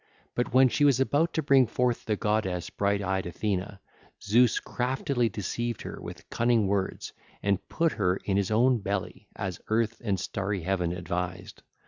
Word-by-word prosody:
But 125 - -1
when 130 +1 +6
she 145 +4 0
was 140 -3 +5
about 145 +5 +2
to 160 - +1
bring 135 -3 +5
forth 125 0 0
the 110 - 0
goddess 100 -4 -1
bright 100 0 0
eyed 95 -1 -1
Athene, 100 +1 -2 0.4
Zeus 115 +3 +3
craftily 125 -1 -1
deceived 115 +3 -3
her - - -7
with - - -9
cunning 115 -2 +2
words 95 -1 -2 0.3
and 100 -2 0
put 165 -1 +1
her 90 0 +1
in 100 - 0
his 100 -1 +1
own 120 +3 +3
belly, 100 -1 -4
as 95 -3 -4
Earth 115 0 0
and 100 -4 0
starry 100 0 -3
Heaven 90 -2 0
advised. 90 +2 -4
105 Hz, 165 wpm, -28 LUFS, 95-120 Hz, 0.4 s, when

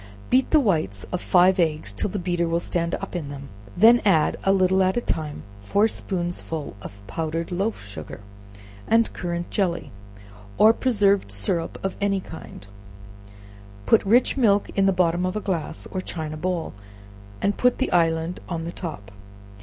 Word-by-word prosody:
Beat 260 +1 +3
the 310 - +5
whites 155 - 0
of 180 - -2
five 185 +1 +4
eggs 155 - 0
till 100 - -1
the 205 - -4
beater 175 -2 -1
will 165 +1 +1
stand 170 0 -1
up 195 - -7
in 155 -5 -4
them; 140 -1 -8 0.3
then 230 +4 +7
add, 165 -7 +3
a 195 - +3
little 190 0 +3
at 185 +2 +2
a - - +4
time, 155 -10 -4 0.2
four 200 - +2
spoonsful 175 -7 -3
of 100 -1 -11
powdered 165 - -3
loaf 195 - -2
sugar, 90 -6 -9 0.7
and 230 0 +3
currant 175 -1 -4
jelly, 180 -5 -1 0.7
or 220 +1 +7
preserved 200 - +2
syrup 105 - -2
of 195 - -3
any 200 -1 +1
kind; 160 - -10 1.2
put 225 - +4
rich 235 +6 +3
milk 205 -6 +3
in 195 0 +2
the - - +5
bottom 180 -1 +1
of 185 +1 -1
a - - 0
glass, 170 -5 -3
or 185 - -3
china 155 -4 -5
bowl, 170 +1 -3 0.7
and 200 0 0
put 250 0 +3
the 265 - -1
island 165 0 +1
on 165 -2 -3
the 170 - -4
top. 105 - -7
175 Hz, 170 wpm, -24 LUFS, 160-200 Hz, 1.2 s, then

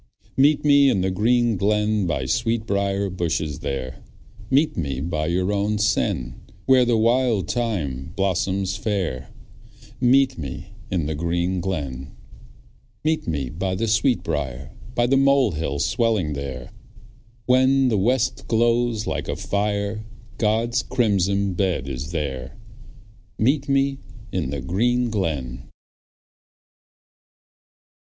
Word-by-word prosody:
Meet 145 +2 +3
me 140 -1 +6
in 95 - +1
the 95 +1 0
green 115 +3 +2
glen, 105 0 +1
By 65 -6 -1
sweetbriar 100 - 0
bushes 80 -5 -2
there; 65 -2 -4 0.5
Meet 145 +4 +3
me 70 -6 -2
by 75 0 -2
your 90 +4 0
own 105 +1 0
sen, 65 - 0 0.2
Where 130 -1 +5
the 120 -1 +2
wild 115 -2 +2
thyme 80 - -2
blossoms 95 0 0
fair. 95 - -2 0.7
Meet 130 +1 +3
me 70 -4 -7 0.2
in 90 -5 -1
the 80 - -2
green 85 +3 -1
glen. 70 -7 -4 0.9
Meet 155 +1 0
me 70 -6 -2
by 95 +3 -2
the 115 +4 -1
sweetbriar, 75 - 0 0.2
By 120 - +3
the 135 +2 +3
mole 135 -4 +4
hill 75 -3 -3
swelling 105 - +1
there; 65 -3 -6 0.7
When 130 +1 +4
the 110 - +1
west 125 +4 0
glows 115 -1 +1
like - - -3
a - - -2
fire 100 +1 -2 0.4
God's 115 +3 +1
crimson 100 -6 +1
bed 90 -7 -1
is 70 +2 -5
there. 70 -2 -4 0.8
Meet 135 +5 +1
me 135 0 +1 0.3
in - - -2
the 70 -1 -4
green 120 - +1
glen. 65 - -3
100 Hz, 120 wpm, -23 LUFS, 80-120 Hz, 0.9 s, me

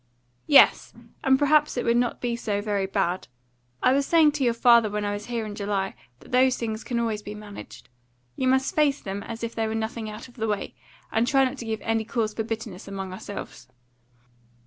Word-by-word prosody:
"Yes, 290 - +6 0.3
and 265 0 +5
perhaps 300 0 +3
it 245 - -1
would 235 0 +3
not 240 0 0
be 240 -1 -1
so 210 -3 -2
very 205 -2 -1
bad. 190 -2 -1 0.6
I 255 - +5
was 275 0 +1
saying 320 -3 +5
to 290 -2 -2
your 235 -2 +2
father 235 -2 +5
when 210 0 -2
I 205 - -1
was 205 0 -6
here 235 -2 -2
in 210 - -6
July 200 -1 -2 0.3
that - - -16
those 255 0 +4
things 220 -1 -4
can 240 -2 -2
always 225 -2 -1
be 210 0 -8
managed. 210 -1 -11 0.5
You 260 - -1
must 265 +1 +2
face 290 -2 +3
them 195 +1 -5
as 230 +2 -7
if 230 - -3
they 225 -1 -1
were 220 - -3
nothing 220 0 -3
out 215 +4 -8
of 245 0 -20
the 225 -1 -1
way, 210 -2 -2 0.4
and 225 +2 +1
try 270 0 +4
not 260 +1 -4
to 235 - -6
give 220 -1 -3
any 225 0 0
cause 215 -1 -2
for 225 - -2
bitterness 220 -4 -5
among 195 -1 -5
ourselves." 195 -4 -8
225 Hz, 215 wpm, -25 LUFS, 210-250 Hz, 0.6 s, Yes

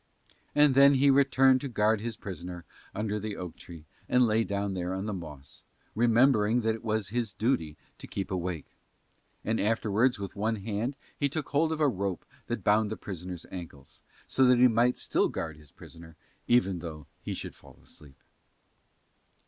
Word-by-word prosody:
And 145 -2 +5
then 140 +1 +7
he 140 +1 +5
returned 135 -1 +4
to 140 - -3
guard 110 -3 +1
his 115 0 -4
prisoner 90 -3 -7 0.3
under 105 0 -2
the 105 0 -5
oak 90 -2 -6
tree 85 -3 -12 0.2
and 125 0 +4
lay 110 0 +2
down 100 -1 -2
there 90 0 -3
on 95 +1 -4
the 105 - -3
moss, 75 -7 -9 0.3
remembering 115 0 +3
that 110 0 +1
it 115 - -8
was 110 -3 -1
his 115 -1 -2
duty 80 - -1 0.2
to - - -9
keep 95 -1 -5
awake. 90 -4 -4 0.7
And 110 +1 0
afterwards 110 +3 +2
with 100 -1 -6
one 110 +2 0
hand 110 +5 -3 0.2
he 140 - 0
took 150 +2 -4
hold 155 +3 +2
of 160 - -2
a 150 - +5
rope 100 -6 -2 0.2
that - - -3
bound 105 +1 +3
the 110 - -4
prisoner's 90 -2 -7
ankles, 80 -7 -10 0.2
so 135 - +2
that 125 -1 +5
he 125 +1 +7
might 120 +1 +2
still - - +1
guard 80 -1 -5
his 75 -2 -17
prisoner 80 +2 -14 0.3
even 95 -7 +3
though 80 -3 -8 0.2
he - - -4
should - - -6
fall - - -18
asleep. 70 -3 -13
105 Hz, 180 wpm, -29 LUFS, 90-125 Hz, 0.7 s, then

